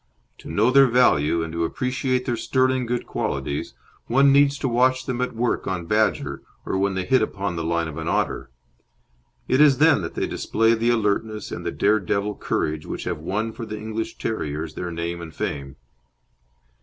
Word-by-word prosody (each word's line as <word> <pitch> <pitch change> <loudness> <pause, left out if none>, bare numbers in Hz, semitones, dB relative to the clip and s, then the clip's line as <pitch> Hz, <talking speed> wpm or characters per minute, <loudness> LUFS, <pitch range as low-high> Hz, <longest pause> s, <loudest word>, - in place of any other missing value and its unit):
To - - -11
know 110 +5 +2
their 135 0 +7
value 85 - +3
and 80 0 -6
to 85 0 -1
appreciate 125 +6 -1
their 120 - 0
sterling 130 +1 +1
good 120 0 -2
qualities, 70 0 -3 0.3
one 135 +3 +5
needs 140 0 +4
to 135 - -2
watch 130 +1 +2
them 125 -1 -2
at 125 - -2
work 120 +1 -1
on 90 -2 -2
badger 105 +3 0 0.2
or - - -2
when 100 0 +1
they 95 -1 -2
hit 130 +6 +3
upon 100 -4 -2
the 85 - -3
line 85 0 0
of 80 0 -6
an 80 - -5
otter. - - -1 1.0
It 130 - +3
is 145 -3 +6
then 155 -6 +5
that 85 - -6
they - - 0
display 115 +1 +1
the 115 +1 +1
alertness 110 -1 0
and - - -5
the - - -2
dare 105 +2 +2
devil 100 +2 -1
courage 75 -3 -2
which - - -5
have - - -3
won 105 +8 -2
for 115 - -8
the 110 -1 -5
English 110 +1 -5
terriers 80 -7 -3
their 90 +2 -4
name 85 +1 -4
and 85 -1 -8
fame. 70 0 -4
110 Hz, 195 wpm, -23 LUFS, 85-125 Hz, 1.0 s, their